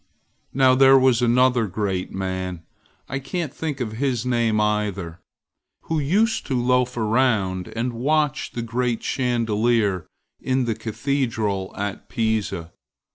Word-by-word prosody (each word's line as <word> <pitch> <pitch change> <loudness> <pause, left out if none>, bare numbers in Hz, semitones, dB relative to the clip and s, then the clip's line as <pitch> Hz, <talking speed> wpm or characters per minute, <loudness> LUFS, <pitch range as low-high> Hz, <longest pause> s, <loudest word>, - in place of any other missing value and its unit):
Now 130 -1 +4
there 135 +1 +7
was 130 -2 +4
another 125 -1 +3
great 95 -1 -2
man, 95 -2 -4 0.4
I 135 - -3
can't 145 +2 -4
think 150 -4 -4
of 120 -4 -3
his 125 +1 -1
name 115 -3 +1
either, 100 -5 -1 0.6
who 160 -1 -2
used 205 +11 +1
to 130 -3 0
loaf 125 0 +1
around 110 -5 +1
and 120 +2 -1
watch 150 +4 0
the 120 - -3
great 120 0 -1
chandelier 115 - 0 0.3
in 130 -1 0
the 115 - 0
cathedral 110 -5 -2
at 100 0 -4
Pisa. 110 -7 -1
120 Hz, 130 wpm, -23 LUFS, 105-130 Hz, 0.6 s, there